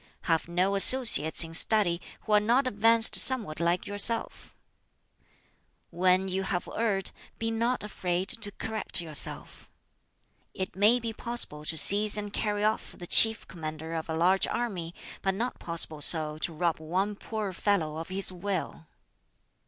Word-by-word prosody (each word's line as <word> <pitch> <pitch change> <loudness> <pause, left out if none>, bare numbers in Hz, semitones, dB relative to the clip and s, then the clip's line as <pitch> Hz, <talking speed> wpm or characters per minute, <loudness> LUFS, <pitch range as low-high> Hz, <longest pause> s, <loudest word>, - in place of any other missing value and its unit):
"Have 165 -2 -2
no 180 +3 -2
associates 200 - +7
in 165 0 -11
study 180 -1 +2 0.2
who 215 - -9
are 210 - +4
not 240 +6 0
advanced 225 -1 +2
somewhat 225 -13 +2
like 170 +1 -2
yourself. 205 +3 0 1.4
"When 185 +2 0
you 190 0 -3
have 185 -2 -5
erred, 205 -4 -2 0.3
be 225 0 -4
not 235 +2 -3
afraid 185 -3 -5
to 210 -3 -1
correct 220 -2 -5
yourself. 160 -3 +2 0.9
"It 190 0 -6
may 210 +5 +3
be 230 -1 -6
possible 225 -11 -5
to 160 - -2
seize 205 +6 +1
and 205 -1 -7
carry 210 -1 -3
off 215 +1 -3
the 175 - -10
chief 225 +4 +7
commander 160 -1 -9
of 160 0 -7
a 160 - -4
large 185 +3 +1
army, 185 -8 -6 0.3
but 195 -1 -2
not 240 +5 -5
possible 165 -2 -3
so 155 -1 +2
to 170 - -3
rob 165 +1 -3
one 185 +6 -4
poor 210 -2 -7
fellow 165 -5 -2
of 165 +2 -8
his 190 0 -1
will. 180 -3 -6
190 Hz, 150 wpm, -26 LUFS, 170-215 Hz, 1.4 s, associates